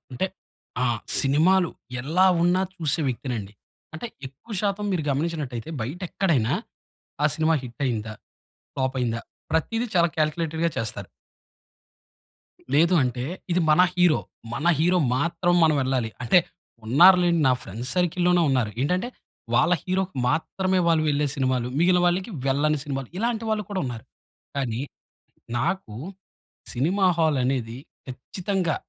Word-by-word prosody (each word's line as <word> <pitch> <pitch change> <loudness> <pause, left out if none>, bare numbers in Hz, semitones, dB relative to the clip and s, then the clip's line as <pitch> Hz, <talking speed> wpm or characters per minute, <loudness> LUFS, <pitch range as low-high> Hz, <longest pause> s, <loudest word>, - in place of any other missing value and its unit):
అంటే 125 +10 -1 0.6
ఆ! - - +2 0.3
సినిమాలు 165 +6 +3 0.3
ఎల్లా 165 +9 +3 0.2
ఉన్నా 180 +2 +3
చూసే 160 -2 0
వ్యక్తినండి. 120 -5 -4 0.4
అంటే 160 +9 -5 0.2
ఎక్కువ 140 - -13
శాతం 205 0 -1
మీరు 175 - 0
గమనించినట్టయితే, 145 -4 -3
బయట 135 +11 -4
ఎక్కడైనా 145 - +1 0.7
ఆ - - +6
సినిమా 160 +1 +2
హిట్ 125 +1 -10
అయిందా? 110 -4 -2 0.6
ఫ్లాప్ 130 0 -1
అయిందా? 115 -2 -1 0.3
ప్రతీది 225 +9 0
చాలా 170 0 +5
కాల్కులేటెడ్‌గా 160 +1 0
చేస్తారు. 105 -4 -3 1.7
లేదు 165 +5 +4
అంటే, 125 -1 -2 0.3
ఇది 180 +1 +2
మన 155 +4 +6
హీరో, 175 -7 +4 0.3
మన 160 +7 -1
హీరో 175 +3 +3 0.2
మాత్రం 170 +5 +1
మనం 155 -1 +4
వెళ్ళాలి. 130 -3 0
అంటే, 120 +9 +5 0.5
ఉన్నారు 175 +11 +7
లేండి 170 -2 +2
నా 130 - +5
ఫ్రెండ్స్ 115 +6 -5
సర్కిల్లోనే 180 0 +2
ఉన్నారు. 125 -6 +1
ఏంటంటే, 180 - 0 0.5
వాళ్ళ 175 +8 +4
హీరోకి 185 -2 -2
మాత్రమే 185 +6 0
వాళ్ళు 160 -2 +3
వెళ్ళే 145 0 +1
సినిమాలు. 130 -3 0
మిగిలిన 180 +1 +4
వాళ్ళకి 185 +5 0 0.2
వెళ్ళని 150 +3 +2
సినిమాలు. 135 -3 -4
ఇలాంటి 230 +1 -1
వాళ్ళు 215 -1 0
కూడా 195 -2 -2
ఉన్నారు. 120 -3 -6 0.5
కానీ, 125 -3 -2 0.8
నాకు 125 - -2 0.8
సినిమా 180 +10 +2
హాల్ 155 -4 +2
అనేది, 125 -2 -2 0.3
ఖచ్చితంగా 175 +6 -2
155 Hz, 130 wpm, -24 LUFS, 130-180 Hz, 1.7 s, ఉన్నారు